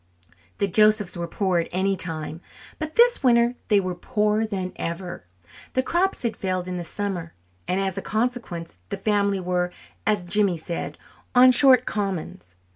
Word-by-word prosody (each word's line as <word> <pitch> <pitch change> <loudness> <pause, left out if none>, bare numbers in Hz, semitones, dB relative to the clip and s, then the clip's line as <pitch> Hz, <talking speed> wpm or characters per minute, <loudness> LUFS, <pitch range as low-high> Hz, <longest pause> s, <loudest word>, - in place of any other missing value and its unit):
The 200 - +1
Josephs 210 0 +3
were 170 -1 -4
poor 185 0 0
at 165 - -2
any 195 +2 +1
time, 160 -2 -4 0.4
but 310 0 -5
this 485 +1 +5
winter 240 -2 +4
they 210 -3 +4
were 185 -2 -2
poorer 210 +3 0
than 190 -3 -4
ever. 170 - -5 0.5
The 260 - +1
crops 350 +5 0
had 235 -2 -1
failed 185 -1 -2
in 180 0 -3
the 175 - -4
summer, 175 -1 -4 0.3
and 185 +1 0
as 195 0 -1
a - - -6
consequence 215 - -3
the - - -3
family 200 -2 +1
were, 180 -1 -1 0.4
as 210 -3 +2
Jimmy 190 -1 +2
said, 155 -2 -5 0.4
"on 255 +1 +8
short 255 -1 +6
commons." 175 - -4
195 Hz, 165 wpm, -24 LUFS, 175-220 Hz, 0.5 s, on